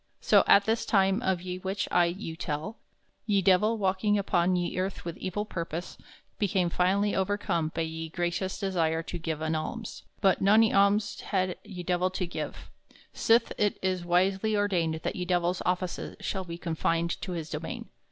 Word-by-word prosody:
So - - +5
at 200 0 +6
this 225 +1 +1
time 195 +1 +2
of 185 -5 0
ye 180 0 -4
which 195 +2 -2
I 175 -1 +5
you 170 -1 -4
tell, 160 +6 -4 0.5
ye 200 -2 +2
Divell, 205 +4 +4
walking 200 +1 +1
upon 185 -2 +2
ye 175 -1 -1
earth 190 -1 -3
with 170 -1 -4
evill 205 +3 -2
purpose, 170 -3 -5 0.4
became 185 -4 +1
finally 195 +4 +2
overcome 190 -5 0
by - - 0
ye 160 0 -5
gracious 175 +3 -2
desire 165 -5 0
to 175 - -6
give 160 -2 -3
an 160 0 0
alms; 210 +8 -4 0.2
but 195 -3 +3
nony 215 +3 +5
alms 200 +1 +3
had 185 -2 -1
ye 180 -3 -8
Divell 180 +1 +1
to 185 - -1
give, 175 - -6 0.4
sith 230 +1 +3
it 205 -1 +2
is 185 -2 0
wisely 190 +5 +2
ordained 170 -6 0
that - - -2
ye 180 - -2
Divell's 175 0 0
offices 180 0 -2
shall 190 -2 -3
be 170 -1 -6
confined 165 0 -1
to 185 - -4
his 165 -2 -5
domain. - - -5
185 Hz, 175 wpm, -28 LUFS, 170-200 Hz, 0.5 s, at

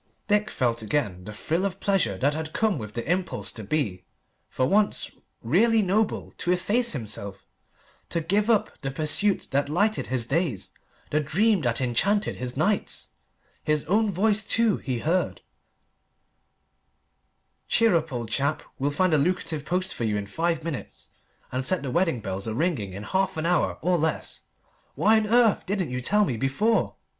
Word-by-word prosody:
Dick 210 0 +2
felt 120 -3 0
again 105 -7 -2
the 105 - -6
thrill 160 - -2
of 195 -1 -2
pleasure 185 - +1
that 140 +8 +1
had 160 0 -5
come 215 -9 +1
with 110 -1 -8
the 120 - -4
impulse 180 +2 -1
to 110 - -7
be, 105 -6 -1 0.5
for 130 - 0
once, 205 +8 +1 0.3
really 215 - +3
noble, 205 +3 0
to 175 - 0
efface 205 +6 +1
himself, 100 -6 -5 0.6
to 170 - 0
give 205 +7 +1
up 220 -3 +2
the 135 - -2
pursuit 155 +8 +2
that 140 +1 +1
lighted 205 +8 +1
his 125 -2 0
days, 135 - -1 0.4
the 150 - +2
dream 190 +7 +2
that 120 -3 0
enchanted 195 - +1
his 125 0 -4
nights. 200 +8 0 0.5
His 150 -1 0
own 210 +5 +2
voice, 210 +3 +1
too, 225 0 +2
he 130 -4 -3
heard 170 +9 0 2.3
"Cheer 230 -5 +4
up, 160 -2 0
old 120 -3 -4
chap! 145 +5 0 0.2
We'll 140 +2 +1
find 175 +4 +1
a 155 - +4
lucrative 155 -2 -1
post 185 +4 -1
for - - -4
you 105 -2 0
in 100 - -3
five 165 +9 -1
minutes, 160 -5 -7 0.4
and 130 +1 -2
set 180 +2 0
the 135 - -3
wedding 165 -7 +1
bells 95 +1 -4
a 110 - -3
ringing 130 - -1
in 100 +2 -7
half 190 - 0
an 160 - -2
hour, 175 +1 +1
or 175 0 +2
less! 160 +1 -2 0.5
Why 220 +1 +4
on 215 - -2
earth 230 -1 +3
didn't 185 -7 -1
you 125 0 -2
tell 210 +10 +3
me 125 -10 -2
before?" 170 - +1
160 Hz, 170 wpm, -26 LUFS, 125-200 Hz, 2.3 s, Cheer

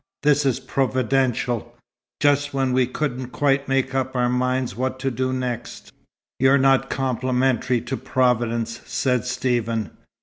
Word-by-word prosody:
This 145 -1 +3
is 130 - +1
Providential 125 -3 0 0.4
just 145 -1 +2
when 135 -2 +1
we 130 -1 +3
couldn't 130 -1 -3
quite 135 +1 +1
make 135 -1 0
up 130 0 -1
our 125 -1 +2
minds 125 -2 0
what 130 +2 -2
to 135 0 0
do 130 +2 -1
next." 125 -2 -5 0.5
"You're 135 +1 +5
not 135 0 +3
complimentary 130 -1 0
to 130 +3 -4
Providence," 120 -2 0
said 125 -2 0
Stephen. 120 -3 -1
130 Hz, 135 wpm, -23 LUFS, 125-135 Hz, 0.5 s, You're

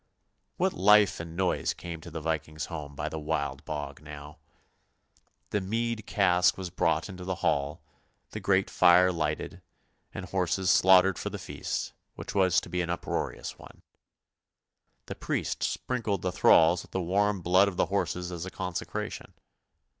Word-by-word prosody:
" - - -49
What - - +1
life 105 +1 +5
and 80 0 -7
noise 95 0 0
came 85 -2 -7
to 85 - -10
the 80 -1 -6
Viking's 75 -1 -3
home 75 -4 -7
by 75 - -3
the 80 0 -4
Wild 70 -2 -2
Bog 75 -1 -5
now. 75 0 -10 1.1
The 105 - 0
mead 115 +2 -2
cask 90 -3 +3
was 95 -2 -5
brought - - +1
into 90 -1 -9
the 95 0 -2
hall, 75 +2 0 0.5
the 110 - -5
great 95 -1 +2
fire 90 +1 +6
lighted, 75 -3 -3 0.5
and 95 - -6
horses 95 0 0
slaughtered 95 0 +5
for - - -3
the - - -6
feast, - - -4 0.2
which - - -7
was 95 -3 +4
to - - -10
be 90 - -1
an 85 - -3
uproarious 85 - -4
one. - - -15 1.2
The - - -6
priest - - -3
sprinkled 110 -7 -2
the 90 - 0
thralls 85 0 +5
with - - -15
the 95 - 0
warm 100 +2 +1
blood 95 +3 +5
of 95 -3 -4
the - - +3
horses 90 -2 -2
as 85 -2 -5
a 95 - -5
consecration. 90 -2 -5
90 Hz, 165 wpm, -28 LUFS, 80-95 Hz, 1.2 s, fire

